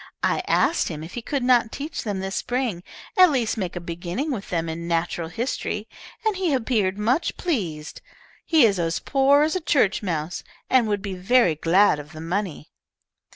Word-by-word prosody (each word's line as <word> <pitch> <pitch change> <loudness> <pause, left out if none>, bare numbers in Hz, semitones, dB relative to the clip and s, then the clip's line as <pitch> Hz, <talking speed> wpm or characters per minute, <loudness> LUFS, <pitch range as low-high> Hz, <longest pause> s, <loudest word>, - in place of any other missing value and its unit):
I - - +2
asked 340 - +2
him 155 -2 -5
if 165 - -9
he 240 - -4
could 275 +2 -2
not 245 -2 +3
teach 295 +3 -5
them 205 -4 -3
this 195 +1 -4
spring, 245 -8 -2 0.3
at 370 -3 +7
least 250 -7 0
make 185 -5 -4
a - - -3
beginning 175 - -4
with 220 -7 -5
them 165 -2 -1
in 165 +1 -5
natural 170 0 -1
history, 215 +1 -3 0.4
and 435 -2 +2
he 355 -7 +1
appeared 220 -6 0
much 250 +10 0
pleased. 175 - -3 0.4
He 315 -7 +5
is 200 -4 +2
as 165 -1 0
poor 280 +1 +3
as 315 +4 0
a 370 - -1
church 255 -10 +2
mouse, 170 -4 -3 0.3
and 250 -3 +4
would 205 -2 -1
be 200 -2 -4
very 190 +1 +3
glad 165 +2 +3
of 150 +3 -11
the 155 - -9
money." 175 -2 -3
205 Hz, 190 wpm, -24 LUFS, 170-260 Hz, 0.4 s, at